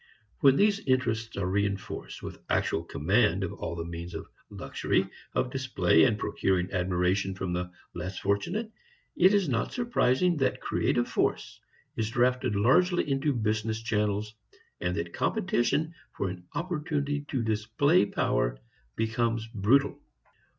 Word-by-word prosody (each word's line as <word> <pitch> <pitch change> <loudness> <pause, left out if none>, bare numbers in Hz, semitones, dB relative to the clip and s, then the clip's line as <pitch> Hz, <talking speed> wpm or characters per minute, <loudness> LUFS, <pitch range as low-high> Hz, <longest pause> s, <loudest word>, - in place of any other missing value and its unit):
When 135 -1 +6
these 205 +4 +3
interests 115 - 0
are 100 - -1
reinforced 100 +1 -2
with - - -8
actual - - +1
command - - +1
of - - -3
all 85 - -5
the 85 -1 -4
means 85 +1 -7
of - - -5 0.2
luxury, - - -1 0.3
of 125 - 0
display 110 -11 +3
and 105 - +2
procuring 95 -3 0
admiration 95 +1 0
from 95 -1 -3
the 90 0 -2 0.2
less 90 +2 -5
fortunate, 175 - -1 0.4
it 185 +2 +6
is 200 -4 +2
not 120 -4 -1
surprising 180 - +2
that 135 - +1
creative - - 0
force - - -1 0.3
is 110 -1 -1
drafted 125 -1 +1
largely 175 - +3
into 140 +1 +1
business 110 -2 -1
channels, 105 -1 -1 0.5
and 90 0 -1
that 85 0 -4
competition 155 +7 0 0.2
for 100 - -1
an 90 -1 -9
opportunity 150 -4 -2
to 130 -4 -1
display 110 - +2
power - - 0 0.4
becomes 115 0 0
brutal. 120 +8 +2
110 Hz, 135 wpm, -28 LUFS, 95-140 Hz, 0.5 s, When